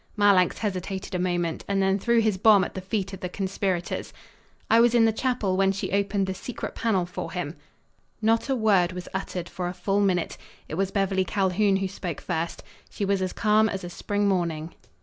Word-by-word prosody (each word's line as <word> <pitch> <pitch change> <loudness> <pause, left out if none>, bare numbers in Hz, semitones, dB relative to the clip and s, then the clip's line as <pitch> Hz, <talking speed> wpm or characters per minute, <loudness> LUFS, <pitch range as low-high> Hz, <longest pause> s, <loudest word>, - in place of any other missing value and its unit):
Marlanx 200 -4 +4
hesitated 190 -2 -4
a 180 - 0
moment, 175 -2 -1
and 200 -1 0
then 195 +1 +2
threw 235 +3 +3
his 215 -3 +2
bomb 210 -2 +6
at - - -4
the 190 - -5
feet 195 0 -3
of 190 - -6
the 180 - -4
conspirators. 190 -2 -2 0.6
"I 225 - +5
was 240 0 +5
in 230 -1 +6
the 225 - +3
chapel 225 -5 0
when 195 0 +3
she 195 - -4
opened 200 0 +1
the 190 - -2
secret 225 +6 -6
panel 195 -6 +1
for 175 - -6
him." - - -3 0.6
Not 225 +4 +1
a 270 - +2
word 195 -6 +3
was 180 -1 -7
uttered 185 -2 -4
for 180 0 -4
a 180 - -5
full 195 +2 0
minute. 180 -4 0 0.3
It - - -8
was 190 +3 0
Beverly 195 -1 +1
Calhoun 195 +1 +1
who 195 0 0
spoke 180 -4 -5
first. 165 -1 -3 0.3
She 200 - -3
was 195 -1 +1
as 185 -1 -1
calm 215 +1 +3
as 195 -2 -4
a 175 - -6
spring 205 +3 -1
morning. 170 -4 -1
195 Hz, 210 wpm, -26 LUFS, 180-205 Hz, 0.6 s, bomb